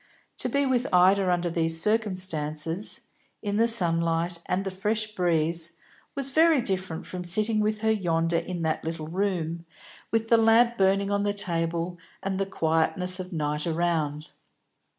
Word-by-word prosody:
To - - 0
be 280 0 +1
with 255 -1 +1
Ida 185 +1 +4
under 175 -1 0
these 165 -1 0
circumstances, 185 -4 -1 0.4
in 205 -1 -1
the 230 +1 +4
sunlight 170 -4 +2
and 190 +2 -1
the 195 - -2
fresh 215 +3 -1
breeze, 170 -2 0 0.4
was 275 -1 -3
very 320 0 +5
different 185 -7 -3
from 180 -1 -6
sitting 215 +5 +1
with 215 0 0
her 220 0 +2
yonder 170 -5 +1
in 175 -2 -5
the 160 -1 0
little 160 -1 -4
room, 170 -3 -2 0.5
with 225 0 0
the 230 - +6
lamp 225 +2 +4
burning 195 0 +2
on 200 0 +1
the 205 0 0
table, 170 -2 -2 0.2
and 190 -1 -2
the 195 - 0
quietness 180 +2 0
of 185 +1 -6
night 150 -1 -2
around. 160 -3 -1
185 Hz, 155 wpm, -26 LUFS, 165-210 Hz, 0.5 s, the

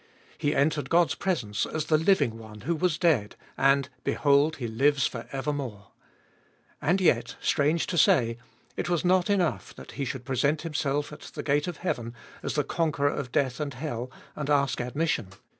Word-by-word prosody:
He 145 - 0
entered 145 -1 +1
God's 170 -4 +4
presence 125 - -1
as 155 -1 -2
the 155 - +3
living 160 - +2
One 110 -1 -11
who 165 +9 -1
was 160 -1 +1
dead, 145 - +2 0.2
and 135 0 +3 0.2
behold, 145 +2 +3
He 125 -5 -4
lives 135 +4 +2
for 115 - -4
evermore. 135 -8 -4 0.9
And 180 +5 +2
yet, 120 -10 +2
strange 150 +3 +1
to 175 - 0
say, 115 -3 +4 0.4
it - - -3
was 175 0 0
not 185 +1 +3
enough 185 -5 0
that - - -11
He 140 - -3
should 125 -1 -5
present 140 +4 +1
Himself 145 -2 -1
at - - -10
the - - -7
gate 145 +2 +1
of 175 -3 -4
heaven 120 -9 -3 0.3
as - - -3
the 150 - +2
con 165 +1 0
queror 145 0 0
of 125 -4 -4
death 130 -3 0
and 145 -3 -3
hell, 125 -3 -4 0.3
and 150 -1 -4
ask 140 -3 +2
admission. 135 -2 -1
145 Hz, 180 wpm, -27 LUFS, 125-160 Hz, 0.9 s, God's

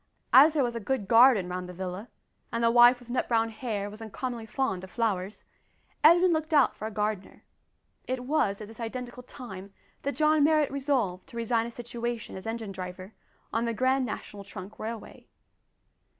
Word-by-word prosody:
As 295 +4 +8
there 285 - +3
was 240 -1 -2
a - - -2
good 225 -2 -2
garden 230 -4 +6
round 180 0 -5
the - - -8
villa, 185 +4 -6 0.4
and 230 0 -1
the 230 - +4
wife 240 +1 +7
with 245 -1 -12
nut 255 - 0
brown 225 -1 +2
hair 215 -4 -3
was 210 +2 -10
uncommonly 230 +1 -5
fond 215 -7 -2
of 190 - -9
flowers, 205 -3 -2 0.6
Edwin 345 +3 +6
looked 315 0 -1
out 285 -3 +4
for 215 - -5
a - - -6
gardener. 210 -2 -3 0.6
It 255 -1 -3
was 235 -8 0
at 210 - -7
this 225 +1 -14
identical 245 +1 -6
time 200 -6 -10 0.3
that 280 - -3
John 305 -1 +3
Marrot 305 -1 +3
resolved 260 -10 -1
to 250 -4 -10
resign 230 0 0
his 235 - -8
situation 240 -1 -5
as 190 +3 -8
engine 225 -2 -4
driver 185 +1 -8 0.4
on 230 +2 +1
the 230 -1 -2
Grand 260 +3 +2
National 210 -3 -6
Trunk 195 0 -10
Railway. 225 0 -7
230 Hz, 185 wpm, -28 LUFS, 205-255 Hz, 0.6 s, As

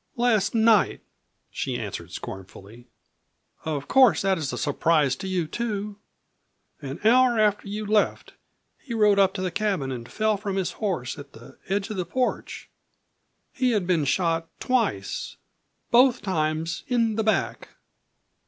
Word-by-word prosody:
"Last 235 -4 +1
night," 220 -2 +3 0.5
she - - -3
answered - - -6
scornfully. 100 +5 -9 0.8
"Of 145 -3 -3
course 260 -7 +5
that 190 -2 +1
is 145 -4 -3
a - - -4
surprise 145 -1 +2
to 190 - -6
you 185 -3 -1
too. 210 +2 -4 0.8
An 140 0 -6
hour 245 +1 +5
after 210 -2 +2
you 210 +1 -4
left 210 0 0 0.5
he 235 -4 -6
rode 210 -2 +4
up 190 -1 +3
to 185 - -3
the 185 - -1
cabin 195 -10 -1
and 120 -2 -7
fell 215 -1 +1
from 200 -1 -4
his 190 -2 -1
horse 175 - -3
at 140 0 -11
the 115 +1 -15
edge 200 +2 -1
of 210 - -5
the 180 - -1
porch. 255 +4 -3 0.9
He 255 -3 +1
had 205 -4 0
been 170 -5 +1
shot 165 +2 0
twice 220 - -1 0.6
both 245 +1 +5
times 160 -3 -1
in 230 -3 +1
the 220 - 0
back." 215 0 0
195 Hz, 150 wpm, -25 LUFS, 155-220 Hz, 0.9 s, course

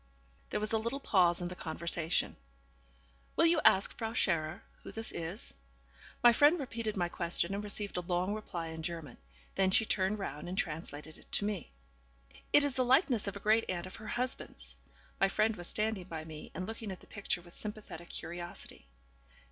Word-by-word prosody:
There - - 0
was 215 +1 -1
a 220 - +4
little 235 +5 -2
pause 180 -8 +4
in - - -1
the 180 - -6
conversation. 170 0 0 1.0
'Will 330 - +5
you 335 +1 +5
ask 210 -3 +6
Frau 225 -1 -3
Scherer 170 -5 +1 0.2
who - - -8
this 225 0 -1
is?' 170 +6 -4 0.7
My 240 -1 +9
friend 300 +7 +6
repeated 230 -6 -3
my 175 -2 +2
question, 170 +1 0
and 200 +1 -2
received 205 -1 -3
a - - +1
long 180 +3 0
reply 175 -6 -4
in 160 0 -6
German. 165 -2 -5 0.3
Then 190 -1 +3
she 220 +4 +5
turned 200 0 +2
round 175 -4 -4
and 185 - -4
translated 155 -4 -3
it - - -19
to 205 - +3
me. 210 -1 -2 0.8
'It 290 - +7
is 285 -2 +1
the 260 0 +2
likeness 250 - +4
of 200 - -2
a - - -5
great 215 +3 +4
aunt 175 -1 -1
of 185 - -8
her 215 - -9
husband's.' 250 +3 -2 0.5
(My 195 - +5
friend 215 +2 +2
was 175 -2 -4
standing 215 -3 0
by 160 -3 -6
me, 155 -1 -8
and 185 - -2
looking 225 0 -5
at 185 - -6
the - - -15
picture 195 -4 -2
with 175 0 -15
sympathetic 210 -4 -7
curiosity.) 175 - -6
195 Hz, 190 wpm, -33 LUFS, 175-220 Hz, 1.0 s, My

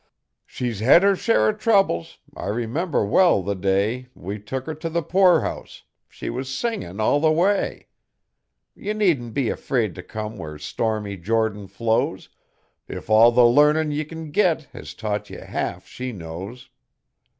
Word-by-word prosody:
She's 120 -5 -4
hed 130 - +6
her 200 0 +4
share 230 +4 +2
o' - - +4
troubles; 200 - +1 0.2
I - - -6
remember 120 - -1
well 135 - +4
the 100 +3 -1
day 100 +6 0
We 100 +4 -6
took 130 +6 -5
her 160 - -4
t' 155 +2 -5
the 170 +1 -1
poorhouse 180 0 +1 0.3
she - - -8
was 130 +2 -4
singin' 130 - -3
all 110 +7 +3
the 155 +1 +3
way; 190 +6 +1 0.9
Ye 210 - -4
needn't 165 - 0
be 135 -5 +1
afraid 115 -7 -1
t' 90 - -8
come 110 +3 -6
where 75 -3 -7
stormy 105 +5 -3
Jordan 105 +1 -1
flows, 110 +4 -1 0.6
If - - -7
all 115 +2 +7
the 120 0 +5
larnin' 150 +5 +4
ye 150 +1 -1
can 160 0 -8
git 165 -2 +2
has - - -9
taught 105 -2 -3
ye - - -8
halfshe 130 0 -5
knows.' 95 +8 -8
120 Hz, 155 wpm, -23 LUFS, 105-160 Hz, 0.9 s, all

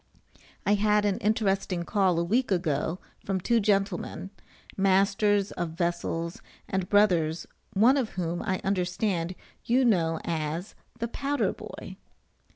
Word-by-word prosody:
I 205 - +4
had 210 0 +3
an 200 -2 +1
interesting 195 -4 0
call 190 -2 +2
a - - +1
week 240 +9 +1
ago 165 -3 0 0.3
from 195 -1 -1
two 230 +6 +2
gentlemen, 195 -2 -1 0.4
masters 195 +1 +2
of 165 -2 -4
vessels, 170 -1 -2 0.3
and 190 -1 -2
brothers, 175 -6 +3 0.3
one 235 +8 +5
of 250 -5 0
whom, 175 -1 -2
I 190 -4 -2
understand, 180 -1 -1 0.3
you 250 +2 +3
know 165 -8 +2
as 165 +3 -3 0.2
the 235 - -2
"powder 280 +4 -1
boy." - - -9
195 Hz, 130 wpm, -27 LUFS, 170-210 Hz, 0.4 s, one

